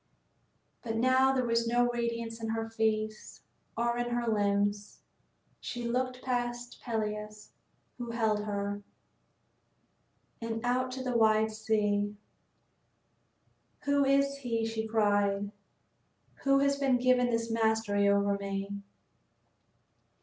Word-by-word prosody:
But 225 -2 -3
now 260 +3 +4
there 260 -2 +1
was 230 0 +1
no 245 +1 +3
radiance 235 -1 -3
in 225 - -3
her 225 0 -2
face 215 -1 -2 0.3
or 235 +1 0
in 240 0 -1
her 240 -1 -1
limbs. 205 -1 0 0.6
She 240 -1 -5
looked 255 +1 -2
past 245 -1 -3
Peleus, 210 -2 -4 0.5
who 240 -1 -5
held 220 -3 0
her, 205 0 -3 1.6
and 225 0 -3
out 255 +1 +1
to 260 0 -5
the 250 -1 -2
wide 220 -1 +4
sea. 210 -1 0 1.7
"Who 285 0 +2
is 275 0 +2
he," 230 -4 -1
she 225 0 -3
cried, 205 -2 +1 0.9
"who 275 0 +4
has 280 0 +2
been 270 -3 +3
given 250 0 +3
this 230 -1 -1
mastery 220 -3 +2
over 200 0 +2
me?" 200 0 -4
225 Hz, 115 wpm, -30 LUFS, 210-245 Hz, 1.7 s, now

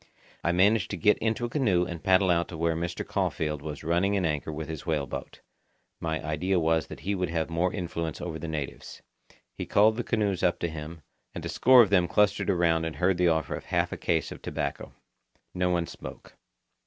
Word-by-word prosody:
I 85 - +2
managed 100 +3 +3
to - - -4
get 105 -1 +3
into 115 +2 0
a - - -4
canoe 105 -10 +2
and 85 -2 -7
paddle 95 -1 +4
out 85 0 +1
to 85 - -8
where 85 0 +1
Mr. 85 +1 -3
Caulfeild 75 -2 -1
was 75 0 -6
running 90 +5 +1
an 95 - 0
anchor 75 -1 -1
with 80 +1 -5
his 80 -2 -6
whale 75 -4 -1
boat. - - -7 0.6
My 80 -1 -3
idea 90 +5 0
was 80 0 +1
that - - -9
he 100 - -1
would 90 -3 -1
have 80 0 -2
more 85 +2 +1
influence 85 -4 -4
over 80 -2 -5
the 85 - -5
natives. 75 -4 -6 0.5
He - - -6
called 110 +2 +4
the 120 - -1
canoes 105 -5 0
up 90 -1 +2
to - - +1
him, 80 0 -8 0.3
and - - -5
a - - -3
score 125 -1 +7
of 100 - -2
them 90 -3 +4
clustered 105 +1 +2
around 85 -3 +2
and 80 -1 -3
heard 90 0 +1
the 90 - +4
offer 80 -1 +1
of - - -6
half - - 0
a - - -4
case 80 -1 0
of - - -9
tobacco. - - -4 0.6
No 90 0 0
one 85 -1 +1
spoke. - - -10
85 Hz, 215 wpm, -27 LUFS, 80-95 Hz, 0.6 s, score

